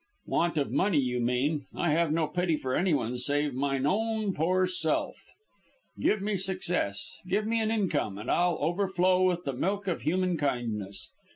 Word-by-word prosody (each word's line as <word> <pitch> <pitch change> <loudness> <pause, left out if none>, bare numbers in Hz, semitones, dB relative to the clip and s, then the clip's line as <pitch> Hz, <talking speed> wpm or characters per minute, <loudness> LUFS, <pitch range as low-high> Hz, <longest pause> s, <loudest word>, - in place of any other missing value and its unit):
"Want 170 -1 0
of 140 - 0
money, 190 -5 +2
you 125 -3 +1
mean. 130 +5 0
I 175 - +1
have 165 0 +2
no 160 0 +2
pity 170 +2 0
for 130 -2 -3
anyone 145 -9 +1
save 145 +2 0
mine 135 +1 0
own 220 +2 0
poor 185 +4 +2
self. 180 -4 -1 0.7
Give 210 -2 +1
me 205 -1 0
success, 180 - -1
give 205 +3 +1
me 225 +1 +1
an 220 - 0
income, 190 - 0
and 105 - -3
I'll 175 -1 +2
overflow 185 +1 +2
with 180 -1 +2
the 140 - -2
milk 200 +9 -1
of 180 - -1
human 180 +1 +1
kindness. 110 -9 -2
170 Hz, 170 wpm, -29 LUFS, 135-185 Hz, 0.7 s, money